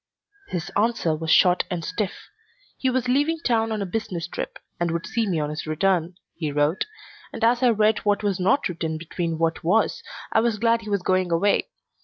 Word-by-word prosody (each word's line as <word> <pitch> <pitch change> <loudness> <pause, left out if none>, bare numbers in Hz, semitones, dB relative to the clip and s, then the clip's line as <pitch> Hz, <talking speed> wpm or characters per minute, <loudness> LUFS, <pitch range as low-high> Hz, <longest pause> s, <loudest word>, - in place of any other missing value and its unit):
His 175 -2 -4
answer 210 -7 +1
was 160 +1 -5
short 180 +1 +5
and 175 -4 -3
stiff. 205 -3 -4 0.5
He 260 - 0
was 255 -1 0
leaving 290 +6 +2
town 225 -2 +2
on 215 -2 -1
a - - -3
business 180 -4 -3
trip - - -5 0.2
and 175 0 +1
would 170 +2 -2
see 225 +3 -1
me 175 -5 0
on 150 0 -2
his 150 +1 -5
return, 175 +1 +1 0.2
he 155 -3 -3
wrote, 145 +4 +1 0.5
and - - -6
as 235 +2 +4
I 250 - +5
read 215 -1 +3
what 205 0 0
was 200 -2 0
not 230 +10 +2
written 165 -3 -3
between 165 0 -3
what 165 0 0
was 200 +7 +2 0.3
I - - +4
was 230 -1 +1
glad 230 +1 +2
he 215 - -8
was 200 -3 0
going 185 -1 +1
away. 175 +5 +2
190 Hz, 205 wpm, -24 LUFS, 165-225 Hz, 0.5 s, short